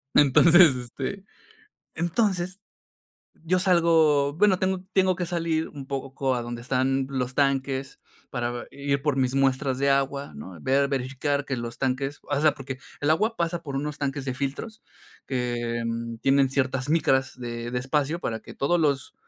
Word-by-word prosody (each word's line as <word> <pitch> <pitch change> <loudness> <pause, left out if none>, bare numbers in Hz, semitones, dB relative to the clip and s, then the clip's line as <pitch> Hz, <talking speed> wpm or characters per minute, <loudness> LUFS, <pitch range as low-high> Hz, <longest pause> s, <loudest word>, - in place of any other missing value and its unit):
Entonces, 160 +2 +7
este, 130 +10 -5 0.7
entonces 185 +2 0 0.8
yo 180 +2 +2
salgo 165 -6 +4
bueno, 190 +2 +4
tengo 190 0 -1
tengo 185 -2 +3
que 180 - -1
salir 165 -2 -1
un 140 -2 -9
poco 135 -1 -2
a 120 - -2
donde 120 0 -6
están 130 +2 0
los 130 -2 -3
tanques 135 -1 0 0.3
para 120 -1 -2
ve 120 - -6
ir 140 0 -1
por 145 -2 0
mis 130 0 +1
muestras 135 -1 +1
de 140 +1 +2
agua, 140 - 0
¿no? 85 +4 -9
Ver, 140 +1 +2
verificar 140 +2 -1
que 135 -3 -3
los 120 0 -5
tanques 135 +2 -1
o 145 -1 -1
sea, 155 -1 +4
porque, 135 -2 -7 0.2
el 145 - +1
agua 215 +8 +2
pasa 170 0 -1
por 140 -4 -6
unos 145 +1 -3
tanques 140 -1 -2
de 130 -2 -2
filtros, 140 - -5 0.4
que 120 -2 -2 0.4
tienen 135 0 +3
ciertas 130 0 -1
micras 135 -5 +2
de 120 -1 -5
de 125 - -1
espacio 150 +5 0
para 110 -8 -3
que - - -12
todos 175 +5 +1
los 140 -5 0
140 Hz, 165 wpm, -25 LUFS, 130-160 Hz, 0.8 s, Entonces